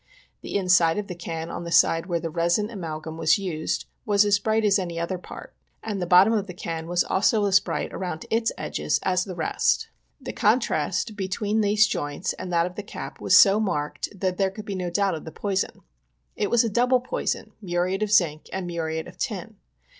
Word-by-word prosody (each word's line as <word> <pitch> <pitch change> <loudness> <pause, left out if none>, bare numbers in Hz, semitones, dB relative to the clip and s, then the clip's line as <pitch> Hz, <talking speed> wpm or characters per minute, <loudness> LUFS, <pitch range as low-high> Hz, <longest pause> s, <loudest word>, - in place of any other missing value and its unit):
The - - -7
inside 180 -3 +4
of 210 - -2
the 185 - -6
can 165 -1 -5
on - - -5
the 170 - -6
side 165 0 +4
where 170 -2 0
the 165 0 -4
resin 170 +5 +1
amalgum 160 -5 -6
was 160 0 +4
used 175 -6 -3 0.2
was 205 0 +3
as 205 0 +3
bright 220 +1 +1
as 200 -1 +4
any 170 -3 -4
other 175 +2 -2
part, - - -11 0.3
and 205 -4 -3
the 175 - -2
bottom 185 +5 +6
of 205 -2 0
the 180 - -8
can 165 -2 -5
was 175 0 +2
also 205 +2 +2
as 195 -1 +5
bright - - -4
around 180 -3 -4
its 225 0 +2
edges - - -1
as 185 -1 +1
the 185 -3 -7
rest. 160 -2 0 0.3
The - - -7
contrast 210 - +1
between 205 +2 -1
these 210 +1 +4
joints 145 -3 -2
and 180 - -7
that 170 -1 +3
of 180 - -5
the 205 - -5
cap 205 - -8
was - - +5
so 200 +1 +7
marked 150 -9 -2
there 190 +1 +1
could 210 +2 -9
be 200 - -4
no 180 -2 -3
doubt 200 +2 +1
of 160 - -5
the 160 - -8
poison. 195 +1 -3 0.5
It 205 - -1
was 235 -1 +4
a - - 0
double 245 +3 +2
poison 255 - -3
— - - -42
muriate 180 +1 -1
of 210 -1 -1
zinc 165 -8 +2
and 190 -1 -3
muriate 160 -2 -3
of - - -14
tin. 220 -3 -4
185 Hz, 215 wpm, -25 LUFS, 170-205 Hz, 0.5 s, so